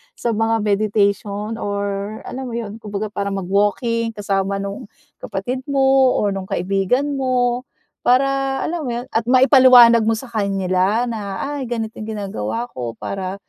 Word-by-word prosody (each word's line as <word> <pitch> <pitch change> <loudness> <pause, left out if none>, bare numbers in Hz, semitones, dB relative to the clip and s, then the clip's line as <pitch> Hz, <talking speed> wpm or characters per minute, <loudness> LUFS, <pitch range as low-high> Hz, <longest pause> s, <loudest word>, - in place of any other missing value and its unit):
sa 235 - -2
mga 225 +1 +1
meditation 205 +1 0
or 200 +1 -3
alam 265 0 -5
mo 230 - -5
'yon, 220 -1 -6
kumbaga 210 -1 -4
parang 200 -1 -3
mag-walking 220 +4 0
kasama 195 -1 -1
nung 200 0 -6 0.3
kapatid 245 +7 -4
mo 270 -1 +4
or 205 - +1
nung 195 -1 -5
kaibigan 195 +10 0
mo, 250 -1 0 0.4
para 270 +1 +2
alam 325 -5 -3
mo - - -2
'yon 240 +1 -4
at 225 0 0
maipaliwanag 255 -3 +7
mo 225 - +3
sa 235 +2 -8
kanila 195 0 +1
na, 205 -4 -4
"Ay, 270 -3 -4
ganito 225 -2 -4
'yong 215 - -6
ginagawa 200 - -3
ko 120 -2 -5
para 190 -1 -4
220 Hz, 150 wpm, -20 LUFS, 200-245 Hz, 0.4 s, maipaliwanag